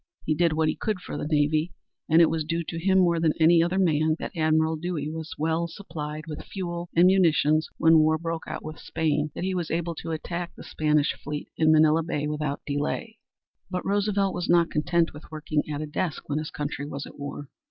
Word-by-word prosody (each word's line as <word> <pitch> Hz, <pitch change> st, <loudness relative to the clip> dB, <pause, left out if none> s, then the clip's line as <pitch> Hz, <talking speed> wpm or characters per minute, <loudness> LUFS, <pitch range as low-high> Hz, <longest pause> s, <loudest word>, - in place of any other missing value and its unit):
He 155 Hz, -, +2 dB
did 165 Hz, +1 st, +2 dB
what 160 Hz, 0 st, +1 dB
he -, -, 0 dB
could 215 Hz, -4 st, -2 dB
for -, -, -7 dB
the -, -, -3 dB
navy 155 Hz, +2 st, +1 dB, 0.4 s
and 165 Hz, +2 st, +7 dB
it 165 Hz, -, +4 dB
was 160 Hz, -1 st, -1 dB
due 165 Hz, +2 st, -2 dB
to 165 Hz, -, -4 dB
him, 190 Hz, 0 st, +4 dB
more 170 Hz, -3 st, +4 dB
than 160 Hz, -2 st, +2 dB
to -, -, -20 dB
any 165 Hz, +1 st, +6 dB
other 175 Hz, +3 st, +1 dB
man, 155 Hz, -4 st, +2 dB
that -, -, -6 dB
Admiral 160 Hz, 0 st, +2 dB
Dewey 155 Hz, -2 st, -3 dB
was 160 Hz, 0 st, -6 dB
so -, -, -7 dB
well 160 Hz, +2 st, 0 dB
supplied 155 Hz, -4 st, -6 dB
with 155 Hz, -2 st, -6 dB
fuel 175 Hz, -2 st, -5 dB
and 170 Hz, +2 st, +6 dB
munitions 160 Hz, -4 st, +3 dB
when 160 Hz, 0 st, +6 dB
war 155 Hz, 0 st, +3 dB
broke 165 Hz, 0 st, -4 dB
out -, -, -6 dB
with 155 Hz, 0 st, -7 dB
Spain 155 Hz, -1 st, -1 dB
that -, -, -4 dB
he 190 Hz, 0 st, -1 dB
was 175 Hz, -3 st, -2 dB
able 170 Hz, +1 st, -1 dB
to 165 Hz, -, -7 dB
attack 170 Hz, +2 st, -4 dB
the -, -, -11 dB
Spanish 150 Hz, -1 st, +1 dB
fleet 150 Hz, +1 st, -5 dB
in 155 Hz, -1 st, +4 dB
Manilla 155 Hz, +1 st, +5 dB
Bay 150 Hz, -3 st, -2 dB
without 150 Hz, -1 st, -2 dB
delay. 150 Hz, +10 st, -3 dB, 0.5 s
But 180 Hz, -1 st, -3 dB
Roosevelt 200 Hz, -1 st, +1 dB
was 175 Hz, 0 st, -3 dB
not 170 Hz, -1 st, +4 dB
content 165 Hz, +2 st, +1 dB
with 150 Hz, -, -12 dB
working 155 Hz, -1 st, -1 dB
at 145 Hz, 0 st, -3 dB
a -, -, -2 dB
desk 155 Hz, +1 st, -3 dB
when 145 Hz, +1 st, -1 dB
his 155 Hz, -, -4 dB
country 145 Hz, -1 st, -4 dB
was 140 Hz, -1 st, -5 dB
at -, -, -13 dB
war. 145 Hz, 0 st, -6 dB
160 Hz, 225 wpm, -26 LUFS, 150-170 Hz, 0.5 s, and